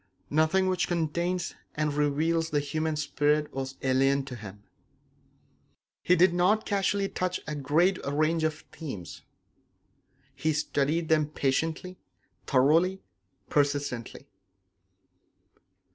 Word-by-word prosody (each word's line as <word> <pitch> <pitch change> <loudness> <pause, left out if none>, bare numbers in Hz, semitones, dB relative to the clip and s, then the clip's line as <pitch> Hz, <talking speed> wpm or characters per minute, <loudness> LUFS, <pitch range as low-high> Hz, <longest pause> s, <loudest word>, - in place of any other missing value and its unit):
Nothing 160 +5 +3
which 185 -1 +1
contains 170 +1 -1 0.2
and 150 -1 0
reveals 155 +3 +1
the 150 - +1
human 155 +2 -2
spirit 150 0 0
was 135 0 -4
alien 135 +1 +2
to 130 -2 -7
him. 105 -2 -10 1.4
He 180 - +4
did 180 0 +5
not 185 +5 +2
casually 200 0 0
touch 185 -1 -2
a 150 - -4
great 155 +7 +1
range 155 +3 +1
of 155 0 -2
themes; 115 - -7 1.1
he 155 0 0
studied 150 +2 0
them 155 -2 +3
patiently, 160 +6 -1 0.5
thoroughly, 165 +8 +3 0.4
persistently. 140 -4 -1
155 Hz, 105 wpm, -28 LUFS, 140-175 Hz, 1.4 s, did